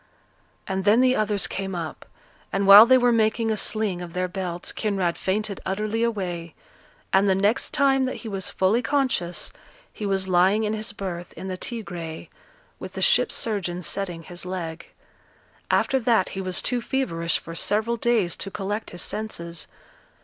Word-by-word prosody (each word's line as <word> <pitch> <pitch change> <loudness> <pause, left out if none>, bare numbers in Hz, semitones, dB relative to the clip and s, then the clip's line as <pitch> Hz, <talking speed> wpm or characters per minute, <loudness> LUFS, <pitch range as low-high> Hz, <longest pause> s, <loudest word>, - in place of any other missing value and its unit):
And 190 0 -2
then 210 +4 +5
the 255 0 +4
others 210 -3 +1
came 195 -1 -3
up; 165 -2 -6 0.4
and 195 +1 0
while 205 +3 +11
they 260 +1 +7
were 245 -1 +3
making 225 0 +2
a - - +1
sling 210 -4 0
of 175 -1 -8
their 185 0 -1
belts, 180 -2 -4
Kinraid 195 -5 -1
fainted 200 +1 -2
utterly 215 +4 -2
away, 180 -8 -2 0.6
and 195 +1 +4
the 190 - +4
next 205 +5 +1
time 275 -3 +3
that 255 - -3
he - - -3
was 195 -3 -3
fully 195 +6 +2
conscious, 255 -12 -1 0.4
he 210 - -4
was 190 -1 0
lying 190 +4 +3
in 210 0 0
his 215 0 -2
berth 180 -4 -6
in 190 - -7
the 185 - -3
Tigre, 180 -7 -6 0.5
with - - -8
the - - -5
ship - - +4
surgeon 180 -5 -2
setting 175 0 -3
his 175 +2 -7
leg. 175 -3 -5 0.8
After 265 - +2
that 225 -6 +2
he 195 - -5
was 185 -1 -2
too 245 -1 0
feverish 170 - -1
for 165 - -9
several 215 +7 0
days 225 -7 +1
to 195 - -4
collect 205 +2 -4
his 175 - -5
senses. 170 -6 -5
195 Hz, 170 wpm, -24 LUFS, 180-220 Hz, 0.8 s, while